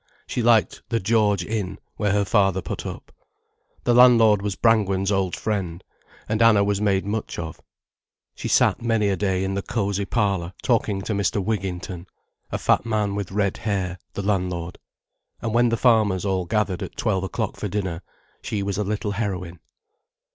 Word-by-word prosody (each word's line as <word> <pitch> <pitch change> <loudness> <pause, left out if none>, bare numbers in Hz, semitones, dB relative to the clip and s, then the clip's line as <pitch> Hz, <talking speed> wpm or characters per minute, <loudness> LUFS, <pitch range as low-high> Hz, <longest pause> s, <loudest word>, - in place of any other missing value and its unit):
She 125 - -2
liked 115 -1 +3
the 115 - +1
"George 105 -3 +2
Inn", 105 -3 -3 0.2
where 105 -2 0
her 100 0 +2
father 95 -1 +2
put - - -5
up. - - -8 0.7
The 120 - +3
landlord 115 -4 +6
was 100 -1 -2
Brangwen's 100 -4 +2
old 95 -2 0
friend, 95 -5 -3 0.4
and 110 +1 0
Anna 110 -3 +6
was 100 0 0
made 100 -2 +1
much 105 +1 -3
of. 80 -1 -6 0.7
She - - -6
sat - - +3
many 115 -3 +1
a 100 - +1
day 95 -2 0
in 95 0 -2
the 100 - -1
cosy 100 -2 -1
parlour 100 -5 0
talking 105 -5 +1
to 110 - -2
Mr. 100 +1 0
Wigginton, 95 -3 -3 0.4
a - - -1
fat - - +2
man 105 -3 0
with 100 -2 -4
red 100 -1 0
hair, 95 -4 -2 0.2
the 100 - -3
landlord. 90 -4 -2 0.6
And 115 -2 -3
when 120 0 +4
the 115 - 0
farmers 110 -6 +3
all 95 -2 0
gathered 105 -2 -1
at - - -7
twelve 95 -5 0
o'clock 95 - -3
for - - -4
dinner, 95 -5 -3 0.4
she 100 -2 -3
was 100 0 -2
a - - +1
little 105 0 -2
heroine. 95 -5 -3
100 Hz, 175 wpm, -23 LUFS, 95-110 Hz, 0.7 s, landlord